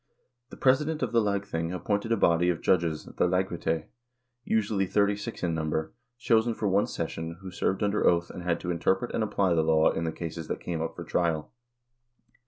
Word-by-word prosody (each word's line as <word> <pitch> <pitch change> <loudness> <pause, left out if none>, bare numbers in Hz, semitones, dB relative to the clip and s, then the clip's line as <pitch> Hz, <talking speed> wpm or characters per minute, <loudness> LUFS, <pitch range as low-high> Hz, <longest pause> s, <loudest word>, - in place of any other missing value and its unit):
The - - -11
president 150 +4 +2
of - - -1
the 115 -1 +4
lagthing 100 -5 -1
appointed 100 +5 -2
a 115 - +3
body 85 -2 +3
of 85 - 0
judges, 85 -4 +1
the - - 0
lagrette,1 85 -3 -1 0.6
usually 105 -4 +1
thirty 100 +1 +2
six 105 +1 -7
in 85 -2 +1
number, 80 0 -2 0.2
chosen 115 -1 +2
for 105 - -1
one 100 +2 +2
session, 80 0 -4
who 95 -1 -8
served 95 +3 -1
under 105 0 +2
oath, 85 0 +2
and - - -7
had 85 -1 0
to 90 - -2
interpret 95 +6 0
and 115 - +1
apply 100 -4 +1
the 80 - +3
law 80 0 +4
in 85 - -2
the 80 - -1
cases 80 -1 -6
that - - -3
came 85 -2 -3
up 80 - -3
for - - -6
trial. 80 -3 -1
90 Hz, 195 wpm, -28 LUFS, 85-105 Hz, 0.6 s, the